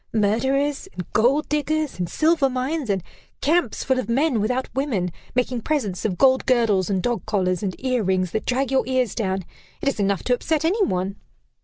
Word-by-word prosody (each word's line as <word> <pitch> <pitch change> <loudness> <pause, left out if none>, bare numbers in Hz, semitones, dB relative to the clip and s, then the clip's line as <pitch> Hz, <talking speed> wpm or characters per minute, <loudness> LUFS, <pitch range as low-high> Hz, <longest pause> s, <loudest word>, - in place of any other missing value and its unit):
Murderers, 265 - +1
and 180 - -5
gold 275 +7 +3
diggers, 300 -3 -1
and 175 -2 -2
silver 315 -3 +2
mines, 260 +1 -2
and 190 -3 0 0.4
camps 300 -6 +1
full 260 -1 +1
of 255 - -4
men 260 -1 +2
without 250 +5 0
women, 235 -10 -1 0.2
making 250 -1 0
presents 220 - -1
of 190 -5 -1
gold 260 0 +4
girdles 225 -7 +3
and 190 -2 0
dog 240 -2 -1
collars, 185 -4 0
and 195 -3 -2
ear 255 -2 0
rings 185 -2 0
that 220 - -3
drag 260 +1 0
your 265 -1 +3
ears 255 -4 +1
down. 190 -4 -2 0.3
It - - -4
is 275 - 0
enough 200 -1 +1
to 250 - +2
upset 315 +5 0
any 400 +6 +2
one." 190 - -1
250 Hz, 190 wpm, -23 LUFS, 200-275 Hz, 0.4 s, gold